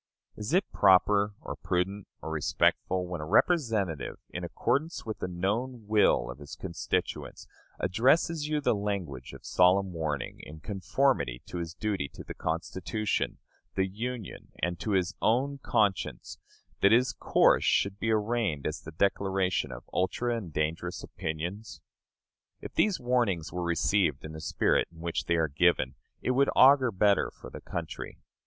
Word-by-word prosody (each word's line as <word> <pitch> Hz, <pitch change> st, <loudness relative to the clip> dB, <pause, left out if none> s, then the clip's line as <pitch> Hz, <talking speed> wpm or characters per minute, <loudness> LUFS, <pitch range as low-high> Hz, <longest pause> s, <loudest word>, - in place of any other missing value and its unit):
Is 105 Hz, 0 st, -5 dB
it 185 Hz, +4 st, +3 dB
proper, 100 Hz, +2 st, +4 dB
or -, -, -6 dB
prudent, 95 Hz, +3 st, -2 dB, 0.2 s
or 80 Hz, -, -4 dB
respectful, 90 Hz, +4 st, +1 dB
when 90 Hz, -3 st, -5 dB
a -, -, -4 dB
representative, 110 Hz, -, +1 dB
in 85 Hz, -, -5 dB
accordance 130 Hz, -, -1 dB
with 110 Hz, -1 st, -5 dB
the -, -, -2 dB
known 105 Hz, +7 st, -2 dB
will 100 Hz, -, +3 dB
of 60 Hz, -, -11 dB
his 75 Hz, +2 st, -9 dB
constituents, 85 Hz, -3 st, -3 dB, 0.3 s
addresses 145 Hz, -, +2 dB
you 150 Hz, 0 st, 0 dB
the 140 Hz, -, +3 dB
language 95 Hz, -, -3 dB
of -, -, -12 dB
solemn 95 Hz, +1 st, +3 dB
warning, 75 Hz, -5 st, -3 dB
in 80 Hz, +1 st, -10 dB
conformity 95 Hz, -, 0 dB
to 90 Hz, -, -6 dB
his 85 Hz, -1 st, -5 dB
duty 100 Hz, -8 st, -2 dB
to -, -, -8 dB
the -, -, -7 dB
Constitution, 85 Hz, +5 st, -2 dB, 0.4 s
the 95 Hz, -, +2 dB
Union, 110 Hz, +2 st, -6 dB
and 85 Hz, 0 st, -2 dB
to 105 Hz, -, -2 dB
his 95 Hz, +1 st, +1 dB
own 135 Hz, +5 st, +1 dB
conscience, 105 Hz, -7 st, 0 dB, 0.4 s
that 100 Hz, -, +6 dB
his 120 Hz, +1 st, +4 dB
course -, -, +3 dB
should 100 Hz, 0 st, +2 dB
be 115 Hz, -, -1 dB
arraigned 110 Hz, -, 0 dB
as 75 Hz, +1 st, -3 dB
the 80 Hz, -, -9 dB
declaration 95 Hz, -1 st, 0 dB
of -, -, -9 dB
ultra 120 Hz, +6 st, 0 dB
and 100 Hz, -8 st, -5 dB
dangerous 80 Hz, +4 st, -2 dB
opinions? 85 Hz, +4 st, -5 dB, 0.8 s
If -, -, -9 dB
these 210 Hz, -3 st, +2 dB
warnings 120 Hz, -10 st, 0 dB
were 90 Hz, -, -2 dB
received 85 Hz, -3 st, +1 dB
in 75 Hz, -, -7 dB
the 80 Hz, 0 st, -8 dB
spirit -, -, +1 dB
in 80 Hz, -, -16 dB
which 85 Hz, 0 st, -2 dB
they 85 Hz, -, +2 dB
are 80 Hz, -1 st, +2 dB
given, 75 Hz, -3 st, +2 dB, 0.3 s
it -, -, +1 dB
would 135 Hz, +2 st, +3 dB
augur 130 Hz, -1 st, +7 dB
better 100 Hz, 0 st, +3 dB
for -, -, -12 dB
the -, -, -9 dB
country. -, -, -6 dB
95 Hz, 160 wpm, -29 LUFS, 80-110 Hz, 0.8 s, augur